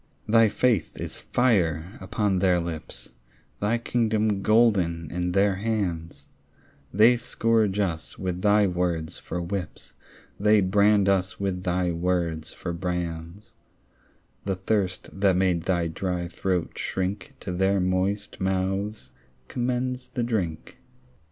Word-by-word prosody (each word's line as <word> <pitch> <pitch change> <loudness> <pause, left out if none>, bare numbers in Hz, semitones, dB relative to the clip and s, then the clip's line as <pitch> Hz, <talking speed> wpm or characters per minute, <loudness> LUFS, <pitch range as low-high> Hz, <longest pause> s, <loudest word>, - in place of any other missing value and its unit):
Thy 115 0 +5
faith 110 -3 +1
is - - -5
fire 95 -7 +1
upon 95 0 0
their 90 -2 +3
lips, 80 -7 -7 0.5
Thy 105 +3 +1
kingdom 110 -3 0
golden 95 -8 +2
in 90 0 -2
their 100 0 +3
hands; 90 -9 -3 0.7
They 115 +5 +5
scourge 115 -4 +1
us 90 -6 -2
with 90 -1 -3
thy 105 0 +4
words 90 -3 -1
for 90 - -5
whips, 90 0 -5 0.5
They 105 +1 +5
brand 100 +1 +3
us 95 +1 +1
with 95 -2 -2
thy 90 -1 0
words 85 -2 -1
for 85 - -5
brands; 85 +1 -4 0.9
The 95 -1 -1
thirst 95 -1 -1
that 95 -2 +4
made 90 -3 +1
thy 90 -3 +1
dry 90 +1 -2
throat 90 -1 -2
shrink 95 +1 -3
To 90 - -4
their 95 +2 +2
moist 95 +3 -1
mouths 95 -3 -1 0.4
commends 125 - -2
the 120 - -3
drink. 95 -9 -3
95 Hz, 125 wpm, -26 LUFS, 90-105 Hz, 0.9 s, Thy